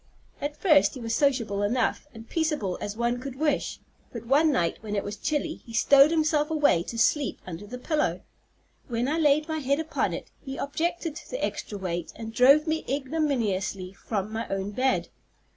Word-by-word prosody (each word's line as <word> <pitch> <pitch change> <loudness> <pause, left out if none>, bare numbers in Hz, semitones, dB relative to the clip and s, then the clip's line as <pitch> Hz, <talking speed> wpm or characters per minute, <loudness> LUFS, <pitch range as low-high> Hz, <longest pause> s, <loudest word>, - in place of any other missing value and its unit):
At 295 +1 -3
first 305 -8 +4
he - - -7
was 230 -1 -3
sociable 230 -8 +1
enough, 245 +7 0
and 225 -2 -12
peaceable 300 - -1
as 205 +1 -4
one 240 +1 0
could 260 0 -6
wish; 295 0 -1 0.3
but - - -7
one 295 +6 +4
night, 170 -11 0
when 210 -1 -4
it 200 - 0
was 205 +1 -5
chilly, 305 +7 -2
he 230 - -12
stowed 275 +5 +6
himself 310 -2 +2
away 295 - +3
to 230 +6 -6
sleep 285 +4 +2
under 185 +3 -7
the 250 +4 -6
pillow. 300 +4 -1 0.7
When 240 0 -1
I 310 +4 0
laid 300 0 +3
my 315 -1 -2
head 280 +1 +1
upon 320 0 -1
it, - - -9
he 270 -1 -6
objected 330 +2 -2
to - - -11
the - - -1
extra 205 - -5
weight, 175 -3 -4
and 225 0 -7
drove 275 +6 +6
me 320 0 -1
ignominiously 245 - -1
from 205 0 -4
my 225 +1 -3
own 195 +1 -3
bed. 260 +5 0
265 Hz, 190 wpm, -27 LUFS, 215-300 Hz, 0.7 s, stowed